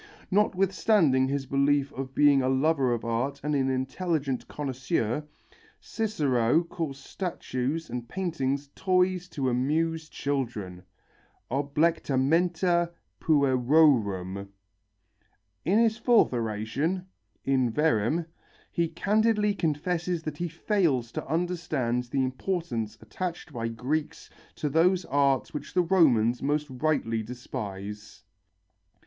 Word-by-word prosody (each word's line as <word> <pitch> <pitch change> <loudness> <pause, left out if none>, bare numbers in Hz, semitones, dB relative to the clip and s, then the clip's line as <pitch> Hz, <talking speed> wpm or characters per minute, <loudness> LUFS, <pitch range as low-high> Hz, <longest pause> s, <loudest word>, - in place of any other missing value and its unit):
Notwithstanding 185 -7 +3
his 140 0 -2
belief 140 +1 +2
of 135 0 -6
being 145 -2 +5
a 130 - +1
lover 135 -1 +2
of 120 -1 -2
art 125 +5 -1
and 150 0 -1
an 135 -2 +1
intelligent 135 +1 -2
connoisseur, 130 -1 -2 0.6
Cicero 150 - +1
calls 165 -5 -5
statues 150 -1 -3
and 120 0 -6
paintings 140 -6 -2
toys 185 -1 +1
to 140 -5 -2
amuse 155 +6 0
children 115 -13 -3 0.7
(oblectamenta 165 +4 +1 0.3
puerorum). 125 - +3 1.2
In 190 +6 +3
his 225 -1 +3
fourth 230 - +4
oration, 120 - -2 0.4
In 130 -3 +2
Verrem, 150 +2 +1 0.5
he 170 -1 +1
candidly 210 +5 +2
confesses 170 +1 -1
that 155 -2 -5
he 175 - -2
fails 165 - 0
to - - -5
understand 160 -7 -1
the 130 +2 0
importance 130 - -3
attached 165 +8 -5
by 115 -2 -2
Greeks 130 +7 -3 0.2
to 150 - -2
those 175 +5 +3
arts 140 -1 +1
which 150 +2 -7
the 180 - +4
Romans 125 - +3
most 145 +2 0
rightly 130 -5 0
despise. 105 -3 -7
145 Hz, 105 wpm, -27 LUFS, 125-170 Hz, 1.2 s, being